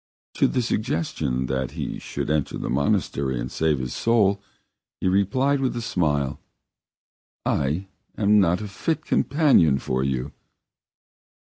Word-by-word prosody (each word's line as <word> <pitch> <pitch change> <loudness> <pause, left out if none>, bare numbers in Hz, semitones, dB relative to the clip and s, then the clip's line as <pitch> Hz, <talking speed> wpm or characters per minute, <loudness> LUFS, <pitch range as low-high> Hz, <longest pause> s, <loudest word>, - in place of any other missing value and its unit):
To - - +3
the 125 - 0
suggestion 80 - -1
that 65 0 -2
he - - -4
should - - -4
enter 75 -2 0
the - - -4
monastery 70 -1 0
and - - -4
save 80 -2 +1
his 65 -1 -4
soul, 100 -4 +2 0.6
he - - -1
replied 115 +9 +2
with 130 -2 -1
a 120 - -2
smile: 75 - 0 1.1
"I 75 +8 0 0.3
am 105 0 +4
not 90 0 +2
a 105 - -4
fit 155 +10 -2
companion 135 - +3
for 65 -1 -1
you!" 65 -2 -2
85 Hz, 135 wpm, -24 LUFS, 70-110 Hz, 1.1 s, am